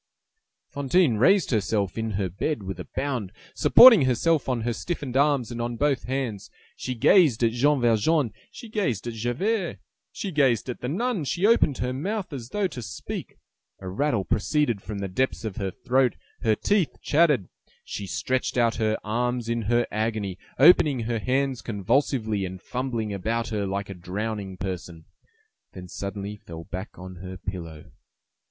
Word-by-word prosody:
Fantine 140 Hz, -2 st, +2 dB
raised 180 Hz, -, +4 dB
herself 100 Hz, -3 st, 0 dB
in 110 Hz, 0 st, -2 dB, 0.3 s
bed 150 Hz, -9 st, -1 dB
with 95 Hz, -1 st, -6 dB
a 90 Hz, -, -7 dB
bound, 130 Hz, -8 st, -2 dB, 0.2 s
supporting 230 Hz, -, +8 dB
herself 135 Hz, +4 st, +1 dB
on 125 Hz, -3 st, 0 dB
her 120 Hz, +1 st, -1 dB
stiffened 140 Hz, -2 st, -4 dB
arms 140 Hz, -3 st, +2 dB
and 120 Hz, 0 st, -4 dB
on 120 Hz, 0 st, -2 dB
both 135 Hz, -3 st, 0 dB
hands: 125 Hz, -5 st, -3 dB, 0.3 s
she 130 Hz, -, -4 dB
gazed 130 Hz, -, +4 dB
at 115 Hz, -, +4 dB
Jean 140 Hz, +5 st, +2 dB
Valjean, 120 Hz, +3 st, +2 dB, 0.2 s
she 235 Hz, -, -10 dB
gazed 190 Hz, -, -1 dB
at 120 Hz, -, -4 dB
Javert, 170 Hz, -, -1 dB, 0.3 s
she 195 Hz, -, -5 dB
gazed 130 Hz, -, +2 dB
at -, -, -10 dB
the 125 Hz, -, -3 dB
nun, 210 Hz, -, -1 dB
she 175 Hz, +7 st, 0 dB
opened 210 Hz, -, +4 dB
her 125 Hz, +1 st, -2 dB
mouth 190 Hz, +5 st, -3 dB
as 120 Hz, -4 st, -6 dB
though 205 Hz, +4 st, -1 dB
to 130 Hz, -9 st, -4 dB
speak; 110 Hz, -, -7 dB, 0.4 s
a 95 Hz, -, -8 dB
rattle 110 Hz, +1 st, 0 dB
proceeded 120 Hz, -2 st, 0 dB
from 105 Hz, +2 st, -6 dB
the 100 Hz, 0 st, -3 dB
depths 120 Hz, +5 st, -1 dB
of 105 Hz, -4 st, -5 dB
her 95 Hz, -1 st, -2 dB
throat, 125 Hz, +6 st, +1 dB, 0.3 s
her 110 Hz, -3 st, +3 dB
teeth 200 Hz, -, 0 dB
chattered; 150 Hz, -, +3 dB, 0.4 s
she 100 Hz, -, -6 dB
stretched 130 Hz, +5 st, -1 dB
out 115 Hz, -1 st, +2 dB
her 110 Hz, -1 st, +1 dB
arms 120 Hz, +2 st, -1 dB
in 115 Hz, 0 st, -1 dB
her 120 Hz, +3 st, +2 dB
agony, 110 Hz, -3 st, -2 dB, 0.2 s
opening 145 Hz, -3 st, +6 dB
her 115 Hz, 0 st, -2 dB
hands 130 Hz, +1 st, 0 dB
convulsively, 110 Hz, 0 st, 0 dB
and 95 Hz, -2 st, -6 dB
fumbling 120 Hz, -5 st, -3 dB
about 115 Hz, +4 st, -2 dB
her 105 Hz, -3 st, -2 dB
like 100 Hz, +1 st, -3 dB
a -, -, -4 dB
drowning 95 Hz, +2 st, -4 dB
person; 85 Hz, -3 st, -6 dB, 0.7 s
then 90 Hz, -1 st, -9 dB
suddenly 100 Hz, +2 st, -5 dB
fell 85 Hz, -4 st, -9 dB
back 95 Hz, +5 st, -7 dB
on 90 Hz, 0 st, -9 dB
her 95 Hz, +1 st, -8 dB
pillow. 85 Hz, -5 st, -7 dB
120 Hz, 165 wpm, -25 LUFS, 100-140 Hz, 0.7 s, supporting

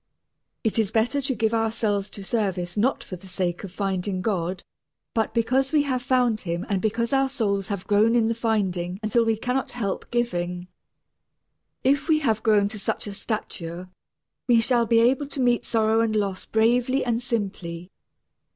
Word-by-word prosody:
It 225 Hz, -1 st, +1 dB
is 215 Hz, -3 st, +2 dB
better 230 Hz, +6 st, +1 dB
to 270 Hz, -1 st, -1 dB
give 220 Hz, 0 st, +1 dB
ourselves 220 Hz, -3 st, 0 dB
to 200 Hz, -, -9 dB
service 190 Hz, -5 st, -1 dB
not 235 Hz, +6 st, +1 dB
for 185 Hz, -, -7 dB
the 190 Hz, +2 st, -15 dB
sake 180 Hz, -1 st, -2 dB
of 195 Hz, -, -7 dB
finding 190 Hz, -1 st, -2 dB
God, 185 Hz, -4 st, -1 dB, 0.5 s
but 225 Hz, -1 st, 0 dB
because 255 Hz, +4 st, +1 dB
we 300 Hz, -2 st, +4 dB
have 260 Hz, -3 st, -1 dB
found 245 Hz, -4 st, +2 dB
Him 170 Hz, -2 st, -3 dB
and 195 Hz, -2 st, 0 dB
because 230 Hz, +4 st, 0 dB
our 270 Hz, 0 st, +3 dB
souls 200 Hz, -7 st, -1 dB
have 200 Hz, -2 st, -4 dB
grown 215 Hz, +4 st, +3 dB
in 230 Hz, -2 st, +3 dB
the 230 Hz, -, +1 dB
finding 195 Hz, -6 st, -1 dB
until 220 Hz, +2 st, +3 dB
we 225 Hz, -1 st, +1 dB
cannot 250 Hz, +4 st, -2 dB
help 205 Hz, -6 st, -3 dB
giving. 180 Hz, -7 st, -2 dB, 1.1 s
If 280 Hz, +4 st, +2 dB
we 315 Hz, -, +5 dB
have 225 Hz, -8 st, +1 dB
grown 210 Hz, -2 st, +4 dB
to 215 Hz, -, -6 dB
such -, -, -2 dB
a 205 Hz, -, -5 dB
stature 185 Hz, -4 st, -5 dB, 0.6 s
we 240 Hz, -2 st, +5 dB
shall 235 Hz, 0 st, +2 dB
be 230 Hz, +1 st, +4 dB
able 265 Hz, +4 st, +3 dB
to 280 Hz, -, -7 dB
meet 245 Hz, -2 st, +2 dB
sorrow 220 Hz, 0 st, +2 dB
and 225 Hz, -1 st, 0 dB
loss 200 Hz, -3 st, -1 dB
bravely 245 Hz, +4 st, +2 dB
and 235 Hz, -1 st, 0 dB
simply. 190 Hz, -7 st, -4 dB
220 Hz, 180 wpm, -25 LUFS, 195-240 Hz, 1.1 s, we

